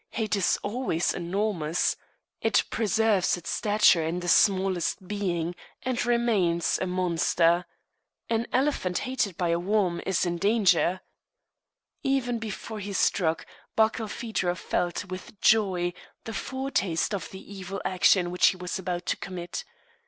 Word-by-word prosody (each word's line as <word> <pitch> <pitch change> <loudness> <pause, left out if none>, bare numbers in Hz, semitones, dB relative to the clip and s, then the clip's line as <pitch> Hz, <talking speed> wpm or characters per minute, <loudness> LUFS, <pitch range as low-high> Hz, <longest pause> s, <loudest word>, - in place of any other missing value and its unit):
Hate 215 -4 -1
is 190 -3 +2
always 205 -6 0
enormous. 180 -2 0 0.5
It - - +3
preserves 220 -4 +2
its 170 - -6
stature 205 -5 +4
in 165 +3 -2
the 175 - -5
smallest 190 -1 +2
being, 180 -5 -2 0.3
and 255 -2 -1
remains 220 -9 +1
a 185 - 0
monster. 175 -1 +2 0.6
An 230 0 0
elephant 255 -10 +1
hated 250 -8 -1
by 175 -2 0
a 170 0 +2
worm 185 -2 +1
is 190 -1 +1
in 175 -1 -2
danger. 190 -3 +3 1.0
Even 260 -4 0
before 220 0 -6
he 200 0 -5
struck, 165 -4 +1 0.3
Barkilphedro 220 -4 0
felt, 175 +3 -2
with 185 +2 -9
joy, 185 -5 +3 0.3
the 225 - -6
foretaste 220 -12 -1
of 200 - -3
the 195 +1 -11
evil 195 0 -6
action 180 -1 +3
which 180 - +4
he 185 - +2
was 180 +1 -4
about 180 -1 -3
to - - 0
commit. 175 -2 -6
190 Hz, 135 wpm, -27 LUFS, 175-220 Hz, 1.0 s, stature